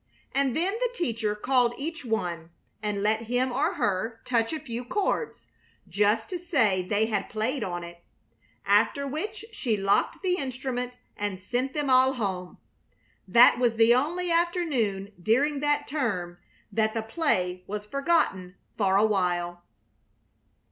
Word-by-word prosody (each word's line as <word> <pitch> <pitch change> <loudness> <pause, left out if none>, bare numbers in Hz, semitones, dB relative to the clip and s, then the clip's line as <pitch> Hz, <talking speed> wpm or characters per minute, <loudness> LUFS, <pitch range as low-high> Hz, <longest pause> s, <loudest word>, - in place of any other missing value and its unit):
And 270 -1 +1
then 365 +4 +1
the - - +1
teacher 230 - -1
called 245 +1 +2
each 320 +2 -5
one 175 -8 -2 0.3
and 205 -2 -2
let 220 +2 +1
him 250 +2 +1
or 310 +9 0
her 215 - -1
touch 230 -2 +1
a 315 - -3
few 245 -5 -5
chords, 410 - -2 0.4
just 210 +4 +1
to 360 - -3
say 250 - +2
they 205 +4 +1
had 220 -1 -2
played 225 +4 -1
on 175 -2 -4
it. 170 0 -11 0.6
After 210 +8 +3
which 405 +11 -4
she 230 - -1
locked 200 - +1
the 365 -1 +1
instrument 255 -2 -4 0.2
and 205 -2 -3
sent 250 +7 -2
them 290 -3 0
all 260 +1 +5
home. 190 -7 -4 0.7
That 240 +5 +7
was 240 -2 +2
the 225 +1 +6
only 340 +8 0
afternoon 295 - 0
during 275 - +2
that 290 0 +1
term 185 - -2 0.3
that 220 0 +1
the 225 - -1
play 185 - -1
was 210 +1 -4
forgotten 245 - 0 0.2
for 195 -2 +3
a 210 - +5
while. 175 -4 0
230 Hz, 150 wpm, -27 LUFS, 200-280 Hz, 0.7 s, That